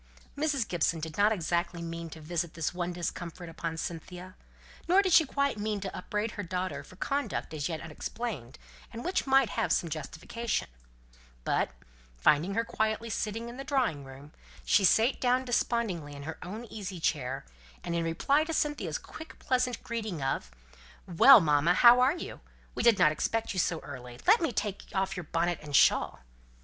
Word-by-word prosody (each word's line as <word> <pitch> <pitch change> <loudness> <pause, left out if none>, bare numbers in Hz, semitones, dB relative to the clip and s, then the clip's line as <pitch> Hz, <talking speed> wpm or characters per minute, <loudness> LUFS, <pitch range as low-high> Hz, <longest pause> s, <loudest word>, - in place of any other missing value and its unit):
Mrs. 285 -5 0
Gibson 165 -1 0
did 155 0 -6
not 205 +1 +4
exactly 170 -2 -1
mean 165 0 -5
to 160 - -10
visit 170 +1 -3
this 165 0 -2
one 175 0 -2
discomfort 175 0 -5
upon 165 0 -5
Cynthia, 180 +3 -6 0.5
nor 375 +4 +5
did 375 -3 +1
she 325 - +7
quite 280 -5 0
mean 210 0 -1
to 195 -1 -5
upbraid 210 +4 -3
her 205 - -5
daughter 185 0 -3
for - - -15
conduct 280 - -2
as 150 0 -2
yet 160 -2 -4
unexplained, 160 - -6 0.3
and 230 +1 -7
which 360 -5 0
might 270 -4 +4
have - - -1
some 170 -3 +1
justification; 165 - -3 0.7
but, - - +1 0.5
finding 155 - +3
her 230 +1 +1
quietly 220 +1 -1
sitting 225 +2 -3
in 240 +1 -8
the 270 - -5
drawing 255 - 0
room, 135 +2 -12 0.3
she 200 - +4
sate 225 +7 +4
down 255 +1 +2
despondingly 220 - -1
in 140 - -8
her 160 +3 -6
own 205 +6 -6
little 235 - -12
easy 195 -4 -5
chair, 135 - -1 0.4
and 170 - -3
in 170 0 0
reply 225 - +2
to 325 +1 -4
Cynthia's 295 -1 -1
quick 320 0 -11
pleasant 250 -2 0
greeting 215 -10 -4
of 135 - -2 0.6
"Well, 210 +9 +8
mamma, 155 +1 +3
how 240 +3 +8
are 265 +7 +3
you? - - -7 0.3
We - - -2
didn't 225 -9 +5
expect 225 +9 -1
you 185 - -2
so 170 -1 +1
early! 125 -3 -9
Let 430 +2 +6
me 325 - +1
take 205 -3 -3
off 190 0 0
your 180 -3 -5
bonnet 170 +2 0
and 145 -2 -4
shawl!" - - +4
185 Hz, 180 wpm, -29 LUFS, 165-235 Hz, 0.7 s, Well